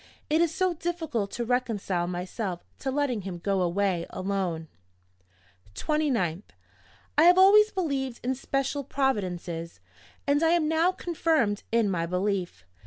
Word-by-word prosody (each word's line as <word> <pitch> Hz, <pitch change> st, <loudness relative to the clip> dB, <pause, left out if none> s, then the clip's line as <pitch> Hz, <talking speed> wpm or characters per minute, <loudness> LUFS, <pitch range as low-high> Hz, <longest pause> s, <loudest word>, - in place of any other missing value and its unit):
It 315 Hz, +2 st, +4 dB
is 340 Hz, -2 st, +2 dB
so 370 Hz, +1 st, +1 dB
difficult 320 Hz, -, -2 dB
to 240 Hz, -, -2 dB
reconcile 215 Hz, -8 st, -1 dB
myself 180 Hz, +1 st, -4 dB, 0.2 s
to 270 Hz, -, -3 dB
letting 265 Hz, -5 st, 0 dB
him 185 Hz, -2 st, -6 dB
go 195 Hz, +2 st, 0 dB
away 180 Hz, -1 st, 0 dB
alone. 185 Hz, -4 st, -2 dB, 1.1 s
"29th. 240 Hz, -, 0 dB, 0.8 s
I -, -, +7 dB
have 355 Hz, +1 st, +7 dB
always 420 Hz, +3 st, +7 dB
believed 275 Hz, -9 st, -2 dB
in 255 Hz, +2 st, 0 dB
special 275 Hz, +2 st, -2 dB
providences; 180 Hz, -11 st, -2 dB, 0.5 s
and 285 Hz, +1 st, +2 dB
I 325 Hz, 0 st, +4 dB
am 335 Hz, -3 st, +2 dB
now 320 Hz, +3 st, +3 dB
confirmed 320 Hz, -, 0 dB
in 230 Hz, -2 st, +3 dB
my 170 Hz, -4 st, -1 dB
belief. 180 Hz, -, -2 dB
235 Hz, 135 wpm, -27 LUFS, 185-310 Hz, 1.1 s, I